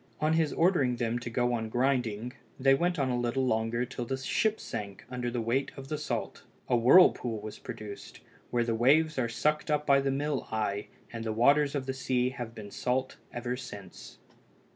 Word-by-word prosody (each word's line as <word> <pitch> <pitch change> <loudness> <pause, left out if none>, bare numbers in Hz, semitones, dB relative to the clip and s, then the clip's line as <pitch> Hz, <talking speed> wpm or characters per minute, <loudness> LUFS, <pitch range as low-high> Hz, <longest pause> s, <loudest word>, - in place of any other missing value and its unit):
On 155 +1 +2
his 160 -2 +2
ordering 160 -8 +3
them 120 0 -1
to 120 - -6
go 120 +1 +1
on 110 -2 -2
grinding, 125 -2 0 0.3
they 135 +1 +5
went 175 +5 +1
on 135 -3 +1
a 125 - 0
little 120 +2 0
longer 115 0 0
till 125 0 -5
the 130 +3 -3
ship 215 +11 0
sank 100 -2 -6
under 125 -1 -2
the 120 0 -2
weight 125 +5 0
of 135 0 -9
the 150 - -2
salt. 150 - -4 0.2
A - - +2
whirlpool 120 -3 +5
was 105 0 -8
produced, 110 -4 -8 0.3
where 120 -1 +1
the 115 -1 -1
waves 140 +6 +3
are 120 -2 0
sucked 150 +6 0
up 150 0 +1
by 140 -1 +5
the 135 - 0
mill 140 +1 -1
eye, 105 -2 -1 0.3
and 115 -1 -5
the 110 - -2
waters 140 +6 +3
of 135 -2 -2
the 135 - -2
sea 130 -1 0
have 120 -4 -7
been 105 -3 -9
salt 130 +4 -1
ever 120 +1 -3
since. 100 -7 -10
125 Hz, 200 wpm, -29 LUFS, 115-140 Hz, 0.3 s, they